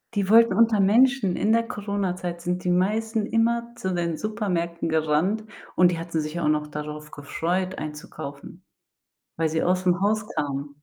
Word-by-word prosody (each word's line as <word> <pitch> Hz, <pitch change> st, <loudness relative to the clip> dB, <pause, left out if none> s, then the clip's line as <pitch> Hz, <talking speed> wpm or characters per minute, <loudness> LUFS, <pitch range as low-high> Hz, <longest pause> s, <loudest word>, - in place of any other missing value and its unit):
Die 200 Hz, -1 st, 0 dB
wollten 230 Hz, +1 st, +6 dB
unter 225 Hz, -2 st, +4 dB
Menschen 220 Hz, -1 st, +4 dB
in 215 Hz, -, +1 dB
der 230 Hz, -, +3 dB
Coronazeit 185 Hz, -4 st, -3 dB
sind 180 Hz, +1 st, -2 dB
die 180 Hz, -, 0 dB
meisten 215 Hz, +4 st, +1 dB
immer 235 Hz, +1 st, 0 dB
zu 190 Hz, -5 st, -3 dB
den 170 Hz, -2 st, -1 dB
Supermärkten 180 Hz, -7 st, -2 dB
gerannt, 160 Hz, +7 st, +1 dB, 0.3 s
und 180 Hz, -1 st, +5 dB
die 170 Hz, -, -3 dB
hatten 165 Hz, -1 st, -3 dB
sich 155 Hz, +3 st, -4 dB
auch 160 Hz, -, 0 dB
noch 150 Hz, 0 st, +1 dB
darauf 150 Hz, 0 st, -7 dB
gefreut, 180 Hz, +6 st, -2 dB
einzukaufen, 150 Hz, -1 st, -8 dB, 0.7 s
weil 160 Hz, -1 st, +1 dB
sie 160 Hz, +1 st, -1 dB
ausm 180 Hz, 0 st, +2 dB
Haus 215 Hz, +2 st, +1 dB
kamen. 145 Hz, -2 st, -4 dB
180 Hz, 160 wpm, -25 LUFS, 155-215 Hz, 0.7 s, wollten